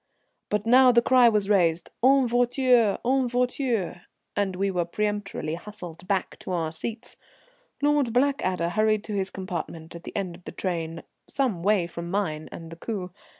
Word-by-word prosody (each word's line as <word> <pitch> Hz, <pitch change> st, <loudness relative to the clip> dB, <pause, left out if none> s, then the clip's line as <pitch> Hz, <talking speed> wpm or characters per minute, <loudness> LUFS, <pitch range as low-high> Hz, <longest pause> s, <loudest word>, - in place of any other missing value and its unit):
But 210 Hz, 0 st, 0 dB
now 255 Hz, +2 st, +7 dB
the 235 Hz, -, +5 dB
cry 250 Hz, -2 st, +6 dB
was 210 Hz, -3 st, +1 dB
raised 175 Hz, -5 st, +2 dB
"En 270 Hz, 0 st, +6 dB
voiture! 245 Hz, -2 st, +3 dB
en 260 Hz, 0 st, +2 dB
voiture!" 245 Hz, -7 st, -1 dB, 0.3 s
and 195 Hz, -2 st, 0 dB
we 195 Hz, +1 st, 0 dB
were 180 Hz, -2 st, 0 dB
peremptorily 205 Hz, -3 st, -3 dB
hustled 175 Hz, -1 st, -8 dB
back 195 Hz, -2 st, -1 dB
to -, -, -7 dB
our 165 Hz, -3 st, -1 dB
seats. 225 Hz, +8 st, -5 dB, 0.7 s
Lord 290 Hz, -4 st, +3 dB
Blackadder 230 Hz, -, +1 dB
hurried 215 Hz, +2 st, +2 dB
to 215 Hz, -, -6 dB
his 195 Hz, -1 st, -1 dB
compartment 170 Hz, -4 st, -6 dB
at 170 Hz, 0 st, -10 dB
the -, -, -9 dB
end 190 Hz, -3 st, -2 dB
of 175 Hz, -, -17 dB
the -, -, -7 dB
train 165 Hz, -3 st, -3 dB, 0.3 s
some 245 Hz, -11 st, -1 dB
way 200 Hz, -1 st, +3 dB
from 170 Hz, 0 st, -7 dB
mine 165 Hz, -6 st, -2 dB
and 165 Hz, -1 st, -9 dB
the 165 Hz, -, -9 dB
coupé. 185 Hz, -2 st, -5 dB
200 Hz, 170 wpm, -26 LUFS, 175-240 Hz, 0.7 s, now